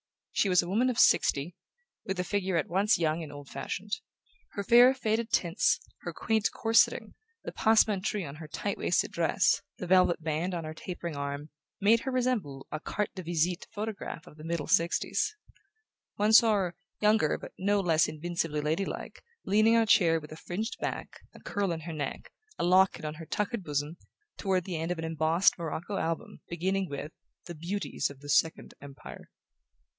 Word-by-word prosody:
She 200 - +1
was 180 -1 +4
a - - -7
woman 225 +8 +2
of 245 - -2
sixty, 150 +5 +3 0.5
with 190 -1 -3
a - - +1
figure 190 -2 -1
at 160 - 0
once 195 +5 +2
young 165 -1 0
and 155 -3 -7
old 145 -1 -10
fashioned. 190 +9 -5 0.6
Her 200 - -3
fair 240 +5 +7
faded 225 -2 -1
tints, 170 +3 +2 0.2
her - - -5
quaint 220 -2 0
corseting, 225 0 +2 0.3
the - - -5
passementerie 210 -3 +2
on 140 +2 -9
her 160 0 -9
tight 195 +6 -3
waisted - - +1
dress, - - +2 0.2
the - - -5
velvet 180 -2 +3
band 165 +4 -1
on 170 - -3
her 155 0 -6
tapering 170 -1 -6
arm, 140 +1 -5 0.3
made 220 +4 +5
her 265 - -4
resemble 240 - -1
a 155 - -3
"carte 210 +5 -3
de 185 - -6
visite" 170 +1 -1
photograph 210 -5 -5
of 150 - -15
the 155 - -11
middle 165 -2 -2
'sixties. 170 - +1 0.8
One 210 +2 +2
saw 225 0 +7
her, 180 -4 -1 0.2
younger 215 +1 +3
but - - -10
no 200 +2 +2
less 165 -4 +3
invincibly 160 -1 -2
lady 160 +6 0
like, - - -7 0.2
leaning 215 +3 +4
on 230 - +5
a - - -1
chair 170 -7 +4
with 150 -1 -12
a 155 - -8
fringed 215 +9 -4
back, - - -4 0.2
a - - -12
curl 200 -3 -2
in 165 -1 -3
her 165 +1 -6
neck, 145 -3 -5 0.3
a - - -2
locket 185 -1 +3
on 150 0 -4
her 160 0 -10
tuckered 210 0 -2
bosom, 150 +1 -3 0.4
toward 190 -3 0
the 175 -2 -4
end 165 +2 -2
of 180 - -2
an 165 - -4
embossed 160 +4 +2
morocco 170 +4 -4
album 165 0 -3
beginning 190 +2 -1
with 145 +2 -5 0.3
The 175 - -7
Beauties 175 +6 -3
of 140 -1 -13
the 145 - -10
Second 160 +3 +1
Empire. 140 -1 -11
175 Hz, 185 wpm, -29 LUFS, 160-205 Hz, 0.8 s, fair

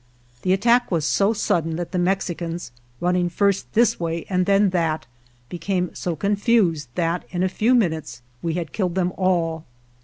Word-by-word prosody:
The 185 - 0
attack 235 +5 +3
was 165 -5 0
so 200 +6 +3
sudden 165 -7 0
that 175 0 -4
the 180 - -1
Mexicans, 175 -4 -2 0.3
running 180 0 +1
first 200 +2 0
this 230 0 +3
way 165 -1 -3
and 180 -1 +1
then 200 -1 +4
that, 165 -3 0 0.4
became 180 +2 -2
so 175 -2 -3
confused 200 - +1
that 170 0 0
in 180 0 -1
a - - +3
few 220 +7 +2
min 210 -9 +3
utes 120 -7 -8 0.2
we 165 -1 -2
had 170 -4 -4
killed 185 -4 -1
them 180 -1 0
all. 170 -4 0
180 Hz, 175 wpm, -23 LUFS, 165-195 Hz, 0.4 s, then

